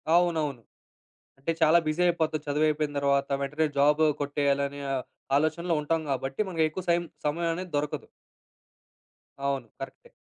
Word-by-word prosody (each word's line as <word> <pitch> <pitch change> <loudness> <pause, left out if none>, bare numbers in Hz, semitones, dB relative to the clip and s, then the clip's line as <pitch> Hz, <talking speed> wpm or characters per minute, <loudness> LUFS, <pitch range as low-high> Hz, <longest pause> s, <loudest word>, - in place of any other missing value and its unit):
అవునవును. 160 -8 +2 0.8
అంటే, 140 +5 -1
చాలా 160 +2 +6
బిజి 155 +3 0
అయిపోది 160 -2 +1
చదువు 150 +2 +2
అయిపోయిన 150 -1 0
తర్వాత 140 0 +2
వెంటనే 150 +3 0
జాబ్ 150 +2 +4 0.2
కొట్టేయాలనే 140 0 0
ఆహ్, 130 - -1 0.3
ఆలోచనలో 160 +3 +1
ఉంటాం 160 +2 0
కాబట్టి 135 +6 -1
మనకు 165 -3 +1
ఎక్కువ 180 +3 -5
సైమ్ 170 0 +3 0.2
సమయం 165 +3 0
అనేది 180 -1 -6
దొరకదు. 145 0 -3 1.3
అవును. 140 -4 -1
కరెక్టే. - - -9
150 Hz, 135 wpm, -28 LUFS, 140-165 Hz, 1.3 s, చాలా